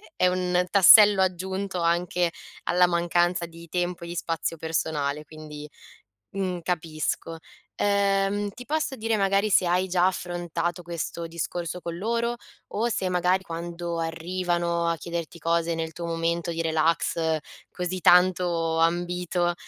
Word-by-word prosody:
è 180 Hz, -, +3 dB
un 180 Hz, 0 st, +1 dB
tassello 200 Hz, +1 st, +8 dB
aggiunto 190 Hz, +1 st, -2 dB
anche 175 Hz, 0 st, +1 dB, 0.3 s
alla 180 Hz, 0 st, +4 dB
mancanza 175 Hz, 0 st, +1 dB
di 165 Hz, 0 st, -13 dB
tempo 175 Hz, 0 st, -2 dB
e -, -, -6 dB
di 175 Hz, -, -6 dB
spazio 165 Hz, 0 st, -2 dB
personale, 150 Hz, -2 st, -2 dB
quindi, 150 Hz, -1 st, -10 dB, 0.6 s
mhmm, 185 Hz, -3 st, -3 dB
capisco. 165 Hz, -1 st, -3 dB, 0.4 s
Ehm, 200 Hz, 0 st, +1 dB
ti 250 Hz, +5 st, -11 dB
posso 310 Hz, -2 st, -1 dB
dire, 225 Hz, -2 st, -1 dB
magari, 200 Hz, +1 st, +2 dB
se 185 Hz, -, +4 dB
hai 180 Hz, +2 st, +1 dB
già 180 Hz, 0 st, +3 dB
affrontato 175 Hz, -1 st, -3 dB
questo 170 Hz, 0 st, -4 dB
discorso 170 Hz, +1 st, -4 dB
con 170 Hz, 0 st, -5 dB
loro 235 Hz, +4 st, -1 dB, 0.3 s
o 230 Hz, +3 st, -1 dB
se 190 Hz, -4 st, -1 dB
magari 180 Hz, +1 st, +1 dB
quando 170 Hz, 0 st, -5 dB
arrivano 170 Hz, +1 st, -1 dB
a 170 Hz, -, +1 dB
chiederti 170 Hz, +1 st, -5 dB
cose 170 Hz, 0 st, 0 dB
nel 160 Hz, -1 st, -4 dB
tuo 170 Hz, +1 st, -6 dB
momento 170 Hz, +1 st, -1 dB
di 165 Hz, 0 st, -2 dB
relax, 160 Hz, 0 st, +1 dB, 0.3 s
così 180 Hz, +1 st, -3 dB
tanto 175 Hz, -2 st, +3 dB
ambito, 175 Hz, +1 st, 0 dB
175 Hz, 135 wpm, -26 LUFS, 165-185 Hz, 0.6 s, tassello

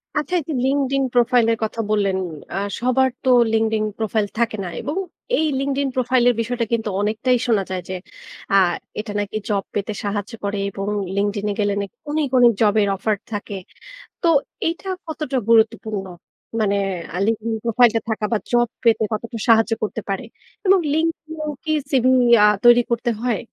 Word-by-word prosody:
আচ্ছা 300 Hz, +4 st, -2 dB
এই -, -, -5 dB
যে -, -, -1 dB
Linkedin 275 Hz, 0 st, +1 dB
প্রোফাইল 245 Hz, -1 st, +4 dB
এর -, -, -2 dB
কথা 220 Hz, +1 st, -2 dB
বললেন। 200 Hz, -3 st, +1 dB, 0.4 s
আ -, -, -1 dB, 0.2 s
সবার 255 Hz, +2 st, +2 dB
তো 260 Hz, -, +1 dB, 0.2 s
Linkedin 220 Hz, -1 st, +1 dB
প্রোফাইল 220 Hz, -1 st, 0 dB
থাকে 230 Hz, -2 st, 0 dB
না 180 Hz, -, -4 dB
এবং 295 Hz, +6 st, -4 dB, 0.4 s
এই 315 Hz, -, +2 dB
Linkedin 275 Hz, 0 st, 0 dB
প্রোফাইল 255 Hz, -1 st, +2 dB
এর 245 Hz, -, +1 dB
বিষয়টা 235 Hz, +1 st, -2 dB
কিন্তু 225 Hz, -2 st, 0 dB
অনেকটাই 220 Hz, +5 st, +1 dB
শোনা 215 Hz, -4 st, +2 dB
যায় 185 Hz, -1 st, -3 dB
যে 185 Hz, -, -3 dB, 0.6 s
আ -, -, +6 dB, 0.4 s
এটা 215 Hz, 0 st, -5 dB
নাকি 205 Hz, +1 st, -3 dB
জব 200 Hz, -2 st, +1 dB
পেতে 205 Hz, +1 st, -2 dB
সাহায্য 205 Hz, +1 st, -3 dB
করে 205 Hz, 0 st, -2 dB
এবং 195 Hz, 0 st, -5 dB, 0.3 s
Linkedin 205 Hz, +1 st, -1 dB
এ -, -, -1 dB
গেলে 205 Hz, -1 st, +1 dB
নাকি 200 Hz, +3 st, -7 dB, 0.2 s
অনেক, 305 Hz, -1 st, 0 dB
অনেক 240 Hz, -1 st, +7 dB
জব 210 Hz, -2 st, +4 dB
এর 200 Hz, -, +2 dB
অফার 215 Hz, +2 st, 0 dB, 0.2 s
থাকে। 205 Hz, -1 st, -4 dB, 0.7 s
তো 340 Hz, -, +3 dB, 0.4 s
এইটা 335 Hz, +3 st, -3 dB, 0.2 s
কতটা 305 Hz, -4 st, -3 dB
গুরুত্বপূর্ণ? 220 Hz, -3 st, +2 dB, 0.6 s
মানে 200 Hz, -2 st, +2 dB, 0.4 s
আ -, -, -2 dB
Linkedin 225 Hz, 0 st, -1 dB
প্রোফাইল 235 Hz, +1 st, +5 dB
টা -, -, +2 dB
থাকা 220 Hz, -1 st, -2 dB
বা 225 Hz, -, +3 dB
জব 240 Hz, 0 st, +3 dB, 0.2 s
পেতে 230 Hz, -1 st, +4 dB
কতটা 230 Hz, +2 st, -4 dB
সাহায্য 225 Hz, 0 st, +5 dB
করতে 215 Hz, +1 st, -2 dB
পারে? 195 Hz, +5 st, -2 dB, 0.4 s
এবং 385 Hz, +1 st, +6 dB
Linkedin 320 Hz, 0 st, -1 dB
এও 305 Hz, -, -2 dB
কি 310 Hz, -, 0 dB, 0.2 s
সিভি 255 Hz, -2 st, +3 dB, 0.3 s
আ -, -, +8 dB, 0.2 s
তৈরি 240 Hz, 0 st, +7 dB
করতে 235 Hz, +1 st, 0 dB
হয়? 240 Hz, -4 st, 0 dB
230 Hz, 180 wpm, -21 LUFS, 210-255 Hz, 0.7 s, আ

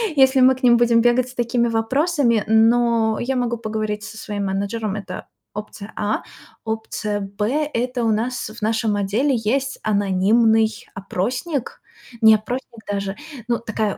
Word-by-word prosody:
если 265 Hz, -1 st, +5 dB
мы 260 Hz, +1 st, +6 dB
к 260 Hz, -, -15 dB
ним 240 Hz, -1 st, +6 dB
будем 235 Hz, -1 st, +4 dB
бегать 240 Hz, +1 st, +2 dB
с -, -, -12 dB
такими 235 Hz, 0 st, +1 dB
вопросами. 235 Hz, -, +1 dB
Но 225 Hz, 0 st, +3 dB
я 265 Hz, +2 st, -1 dB
могу 240 Hz, -1 st, -1 dB
поговорить 215 Hz, -1 st, -3 dB
со 215 Hz, +1 st, -9 dB
своим 205 Hz, -2 st, -4 dB
менеджером- 200 Hz, +2 st, -2 dB
это 200 Hz, -3 st, -7 dB, 0.3 s
опция 210 Hz, 0 st, -8 dB
А. 210 Hz, +1 st, -1 dB, 0.4 s
Опция 220 Hz, -1 st, -3 dB
Б- 210 Hz, +10 st, -2 dB
это 245 Hz, +1 st, -1 dB
у 225 Hz, -, +3 dB
нас 235 Hz, +4 st, -2 dB
в 220 Hz, +2 st, -12 dB
нашем 220 Hz, 0 st, 0 dB
отделе 215 Hz, +8 st, +1 dB
есть 260 Hz, +5 st, -1 dB
анонимный 215 Hz, +2 st, +2 dB
опросник, 240 Hz, -, -3 dB, 0.4 s
не 220 Hz, -1 st, +8 dB
опросник 235 Hz, +2 st, -5 dB
даже, 200 Hz, -1 st, -3 dB, 0.3 s
ну, 235 Hz, -, +1 dB
такая 220 Hz, -3 st, -2 dB
225 Hz, 150 wpm, -21 LUFS, 210-245 Hz, 0.4 s, не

